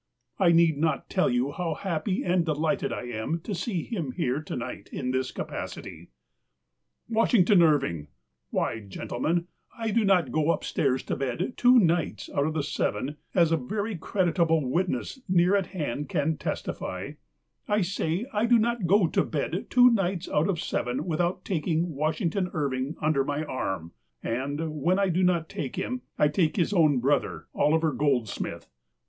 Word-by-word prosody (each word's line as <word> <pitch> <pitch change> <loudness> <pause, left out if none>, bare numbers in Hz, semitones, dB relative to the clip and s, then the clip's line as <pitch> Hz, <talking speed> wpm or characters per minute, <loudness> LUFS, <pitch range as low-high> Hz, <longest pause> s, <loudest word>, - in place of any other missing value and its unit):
I 180 -3 +5
need 165 -3 +4
not 160 0 -1
tell 185 - +2
you 125 +3 +1
how 165 0 -2
happy 190 +2 -2
and 180 -1 +2
delighted 155 -1 0
I - - -4
am 120 +7 -3
to 205 - -5
see 185 -1 -2
him 165 - -4
here 130 +4 -1
to 155 - -6
night 120 - -6
in 125 -2 -2
this 130 0 -1
capacit\\ - - -6 1.0
Washington 220 -4 +4
Irving! 140 - +2 0.4
Why, 115 - -1
gentlemen, 125 - -2 0.3
I 225 -1 -2
do 230 +2 +2
not 195 -4 +3
go 155 0 +1
upstairs 130 -5 0
to - - -2
bed 135 - -2
two 250 +1 +6
nights 165 - +1
out 140 +1 +1
of 155 - -3
the 155 - 0
seven 145 0 -2
— - - -35
as 170 -3 +4
a 165 - +3
very 205 - -3
creditable 165 -4 +1
witness 175 - -1
near 180 +1 +4
at 195 -3 +1
hand 150 -6 -4
can 155 +2 0
testify - - -4 0.3
— - - -52
I 210 0 +2
say 180 +1 -1
I 215 +2 +1
do 240 0 +6
not 230 -4 0
go 200 +1 +5
to 160 - +1
bed - - -3
two 250 -1 +6
nights 190 -5 0
out 155 +6 +1
of 175 -5 0
seven 125 -4 -2
without 175 +2 -1
taking 165 -1 -1
Washington 165 +5 -1
Irving 140 -1 -1
un 155 +1 +3
der 135 -2 +2
my 145 +2 -2
arm; 95 - -3 0.3
and, 145 +5 -3
when 180 +6 +3
I 200 -1 +2
do 180 +2 +1
not 175 -3 +2
take 135 - -5
him, 255 0 -3 0.2
I 150 - +4
take 155 +1 +1
his 190 +1 +1
own 155 -7 +4
brother, 140 +3 0
Oliver 160 +1 +2
Goldsmith. 130 -7 -1
160 Hz, 175 wpm, -27 LUFS, 140-185 Hz, 1.0 s, two